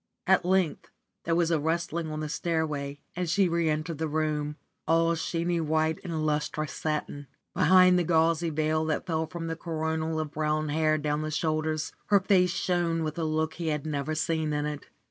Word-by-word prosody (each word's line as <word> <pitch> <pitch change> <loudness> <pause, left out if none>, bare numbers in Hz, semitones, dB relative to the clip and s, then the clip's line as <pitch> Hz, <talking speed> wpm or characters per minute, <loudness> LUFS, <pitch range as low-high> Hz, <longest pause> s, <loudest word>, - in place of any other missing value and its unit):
At 190 -1 +4
length 185 -3 +1 0.4
there 165 - +1
was 170 -1 +2
a 165 - +2
rustling 165 +1 -1
on 155 0 -4
the 155 - -3
stairway, 150 -3 -2
and 180 -1 -2
she 190 +2 +3
re 170 -1 +1
entered 155 +1 -2
the 160 - 0
room, 150 -1 -1 0.3
all 165 +1 +3
sheeny 170 +1 -1
white 160 0 +1
in 160 -3 -3
lustrous 150 0 -1
satin. 150 -2 -3 0.3
Behind 185 -1 +6
the - - +2
gauzy 165 0 +2
veil 155 0 0
that 155 +2 -1
fell 160 -2 -1
from 170 -1 -6
the 165 0 -3
coronal 160 -1 -2
of 155 -1 -2
dark - - -32
brown 155 0 0
hair 155 +1 +2
adown 150 0 -1
the 155 - -3
shoulders 155 0 -1 0.2
her 200 -1 +5
face 185 -2 +3
shone 175 -2 0
with 155 +1 -3
a - - 0
look 155 0 0
he 170 -1 -5
had 150 -2 -1
never 155 0 -2
seen 160 -1 0
in 145 0 -1
it. 150 -2 -5
160 Hz, 195 wpm, -28 LUFS, 155-170 Hz, 0.4 s, Behind